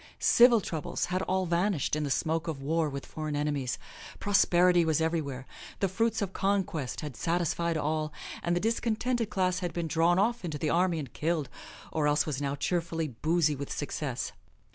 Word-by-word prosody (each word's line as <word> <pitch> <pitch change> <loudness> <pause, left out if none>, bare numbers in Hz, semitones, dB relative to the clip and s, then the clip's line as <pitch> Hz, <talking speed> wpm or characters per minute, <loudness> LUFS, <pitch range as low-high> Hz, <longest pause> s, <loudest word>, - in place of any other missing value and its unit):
Civil 235 -2 +6
troubles 160 -5 -3
had 185 - +1
all 190 0 0
vanished 175 -3 +1
in 155 - -1
the 145 - -2
smoke 160 +4 0
of 155 -4 -3
war 155 +3 0
with 140 -1 -6
foreign 155 -1 -4
enemies. 145 -3 -1 0.4
Prosperity 180 -3 +4
was 160 -2 +2
everywhere, 155 -5 -1 0.3
the 195 - +2
fruits 225 +3 0
of 195 -1 -4
conquest 190 -9 -1
had 150 -5 -6
satisfied 170 +1 0
all, 155 0 -1 0.3
and 175 0 0
the - - +2
discontented 230 +2 0
class 185 -2 +1
had 175 -2 -3
been 170 -1 -2
drawn 165 +3 +3
off 235 +4 +1
into 160 -4 -3
the 150 +1 -1
army 175 0 +2
and 140 -7 -6
killed 155 -4 -1 0.4
or 155 -2 +1
else 150 +1 +3
was 145 -3 -3
now 140 0 -1
cheerfully 165 0 -1
boozy 155 +4 +1
with 140 0 -6
success. 140 -3 -3
165 Hz, 180 wpm, -29 LUFS, 150-185 Hz, 0.4 s, Civil